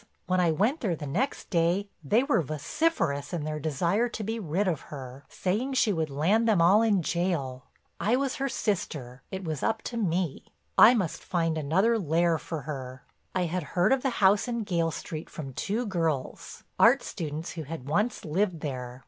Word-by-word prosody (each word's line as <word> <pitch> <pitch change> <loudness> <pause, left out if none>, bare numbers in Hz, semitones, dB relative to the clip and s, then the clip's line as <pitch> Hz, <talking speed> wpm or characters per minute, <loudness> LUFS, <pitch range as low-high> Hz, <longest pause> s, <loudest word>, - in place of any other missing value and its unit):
When 185 +1 +1
I 175 -2 +3
went 215 - +1
there 190 -7 0
the 150 - -7
next 210 - -2
day 175 +4 +2 0.2
they 215 - +3
were 275 - +2
vociferous 155 - -1
in 165 -4 -2
their 155 0 -3
desire 170 - +1
to 220 - -5
be 225 +2 -2
rid 190 +1 -1
of 165 -6 0
her, 135 -1 -8
saying 220 +9 -1
she 225 -5 +3
would 160 -3 -1
land 185 +12 +2
them 210 -5 +4
all 185 +6 +6
in 205 -6 +2
jail. 155 -8 -1 0.3
I 220 +4 +2
was 270 0 -1
her 275 0 -1
sister; 140 - -3
it 190 0 -5
was 155 -5 -3
up 225 -1 0
to 235 - -5
me, 180 -7 -1 0.3
I 245 - +8
must 185 -8 -2
find 165 -3 0
another 190 +10 +2
lair 165 -1 +2
for 160 -1 -5
her. 130 -3 -6 0.3
"I 185 - +2
had 180 +2 -2 0.2
heard 185 +8 +5
of 270 - +1
the 270 - +1 0.2
house 200 +5 +4
in 235 -2 -2
Gayle 170 -5 0
Street 160 0 -6
from 135 -4 -7
two 220 - -2
girls, 165 - -2 0.2
art - - +6
students, 155 0 -5
who 165 - -6
had 150 -3 -7
once 210 +10 0
lived 170 +1 0
there. 125 -3 -5
175 Hz, 190 wpm, -28 LUFS, 155-210 Hz, 0.3 s, I